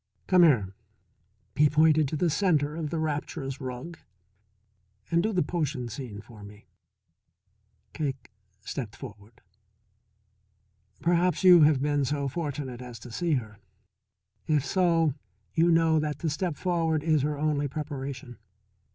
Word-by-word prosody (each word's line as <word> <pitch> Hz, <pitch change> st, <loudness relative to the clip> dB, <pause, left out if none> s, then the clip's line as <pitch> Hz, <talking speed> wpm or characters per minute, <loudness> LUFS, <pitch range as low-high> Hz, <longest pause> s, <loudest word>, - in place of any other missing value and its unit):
"Come 185 Hz, -1 st, +4 dB
here" 120 Hz, -, +4 dB, 0.8 s
he 150 Hz, +1 st, +4 dB
pointed 155 Hz, 0 st, +4 dB
to 155 Hz, -, -4 dB
the 165 Hz, +2 st, +1 dB
centre 150 Hz, -5 st, +1 dB
of 160 Hz, -2 st, -3 dB
the 165 Hz, -, -3 dB
rapturous 150 Hz, -3 st, -3 dB
rug 130 Hz, +6 st, -7 dB, 1.1 s
"and 170 Hz, 0 st, +3 dB
do 220 Hz, -, 0 dB
the 185 Hz, -4 st, +1 dB
potion 145 Hz, -8 st, -3 dB
scene 110 Hz, -4 st, -7 dB
for 105 Hz, -1 st, -14 dB
me." 105 Hz, +1 st, -13 dB, 1.3 s
Cake 140 Hz, -6 st, -4 dB, 0.3 s
stepped 110 Hz, 0 st, -6 dB
forward. 110 Hz, -2 st, -12 dB, 1.6 s
Perhaps 175 Hz, +2 st, +2 dB
you 180 Hz, -2 st, +8 dB
have 145 Hz, -3 st, +3 dB
been 145 Hz, -1 st, +1 dB
so 140 Hz, +1 st, -1 dB
fortunate 140 Hz, -4 st, -4 dB
as 125 Hz, -2 st, -9 dB
to 115 Hz, +2 st, -11 dB
see 170 Hz, +6 st, -1 dB
her. 110 Hz, -6 st, -3 dB, 0.9 s
If 150 Hz, -4 st, +1 dB
so 165 Hz, -5 st, +2 dB, 0.4 s
you 165 Hz, +1 st, +3 dB
know 165 Hz, -1 st, +4 dB
that 150 Hz, -1 st, -2 dB
to 160 Hz, -, -1 dB
step 170 Hz, +1 st, -2 dB
forward 165 Hz, -4 st, 0 dB
is 155 Hz, -3 st, +2 dB
her 150 Hz, +1 st, -1 dB
only 145 Hz, -1 st, 0 dB
preparation. 140 Hz, -3 st, -6 dB
150 Hz, 135 wpm, -27 LUFS, 130-165 Hz, 1.6 s, you